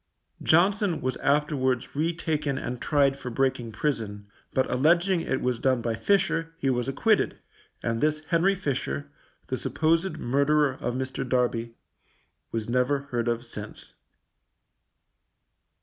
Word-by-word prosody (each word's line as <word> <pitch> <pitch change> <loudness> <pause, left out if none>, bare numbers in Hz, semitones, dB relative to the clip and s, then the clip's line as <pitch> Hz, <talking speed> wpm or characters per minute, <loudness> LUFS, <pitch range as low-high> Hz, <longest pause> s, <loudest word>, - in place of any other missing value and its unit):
Johnson 190 +1 +3
was 130 0 -1
afterwards 140 -4 +1
retaken 155 -2 -1
and 125 -2 -4
tried 140 -2 +2
for 130 - -5
breaking 130 -2 0
prison, 105 -4 -2 0.3
but 130 - +1
alleging 170 +7 +3
it 130 - -1
was 125 -2 0
done 130 -2 +2
by 115 0 -1
Fisher, 165 - +1
he 135 -4 +1
was 125 -1 -1
acquitted, 210 +11 +2 0.5
and 115 -1 -1
this 155 0 +1
Henry 180 +3 +3
Fisher, 145 -3 -3 0.3
the 130 - -2
supposed 160 +7 +1
murderer 140 +3 +2
of 120 - -2
Mr. 130 0 -3
Darby, 120 -2 0 0.8
was 115 -2 -3
never 125 +3 +1
heard 120 -1 -1
of 120 0 -1
since. 105 -2 -9
135 Hz, 130 wpm, -27 LUFS, 125-160 Hz, 0.8 s, Johnson